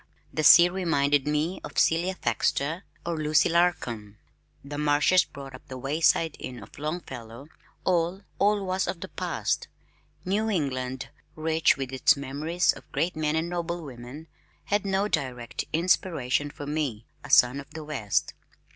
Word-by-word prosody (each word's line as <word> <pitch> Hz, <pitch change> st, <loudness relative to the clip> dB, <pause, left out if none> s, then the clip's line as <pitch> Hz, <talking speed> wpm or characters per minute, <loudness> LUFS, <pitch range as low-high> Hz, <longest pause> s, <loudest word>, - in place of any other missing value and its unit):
The 155 Hz, -, -1 dB
sea 175 Hz, +3 st, +9 dB
reminded 145 Hz, -6 st, +1 dB
me 150 Hz, +4 st, -1 dB
of -, -, -9 dB
Celia 175 Hz, +3 st, +2 dB
Thaxter 145 Hz, -, -1 dB, 0.2 s
or 170 Hz, -1 st, -2 dB
Lucy 155 Hz, 0 st, +3 dB
Larcom. 125 Hz, -12 st, 0 dB, 0.5 s
The 145 Hz, +1 st, -5 dB
marshes 150 Hz, +5 st, +4 dB
brought 135 Hz, -1 st, -10 dB
up 130 Hz, -, -12 dB
the 130 Hz, -, -7 dB
Wayside 155 Hz, +4 st, +2 dB
Inn 125 Hz, -4 st, -7 dB
of 105 Hz, -, -14 dB
Longfellow; 135 Hz, -5 st, -6 dB, 0.3 s
all, 180 Hz, +2 st, 0 dB, 0.2 s
all 205 Hz, 0 st, +2 dB
was 185 Hz, +1 st, -1 dB
of 170 Hz, -, -4 dB
the -, -, -6 dB
past. -, -, -2 dB, 0.6 s
New 210 Hz, +4 st, 0 dB
England, 130 Hz, -7 st, -2 dB, 0.3 s
rich 160 Hz, 0 st, +2 dB
with 135 Hz, -1 st, -4 dB
its 135 Hz, +3 st, +4 dB
memories 150 Hz, +6 st, 0 dB
of -, -, -15 dB
great 175 Hz, +2 st, -1 dB
men 155 Hz, 0 st, 0 dB
and 160 Hz, +1 st, 0 dB
noble 170 Hz, -1 st, -3 dB
women, 130 Hz, +3 st, -9 dB, 0.4 s
had 200 Hz, +6 st, 0 dB
no 195 Hz, +1 st, +1 dB
direct 125 Hz, -, -3 dB
inspiration 155 Hz, -5 st, +1 dB
for 145 Hz, 0 st, -8 dB
me, 140 Hz, -7 st, -2 dB, 0.2 s
a -, -, -10 dB
son 125 Hz, +3 st, +5 dB
of 140 Hz, -, -10 dB
the 160 Hz, -, -8 dB
West. 135 Hz, -10 st, -1 dB
155 Hz, 155 wpm, -27 LUFS, 135-175 Hz, 0.6 s, sea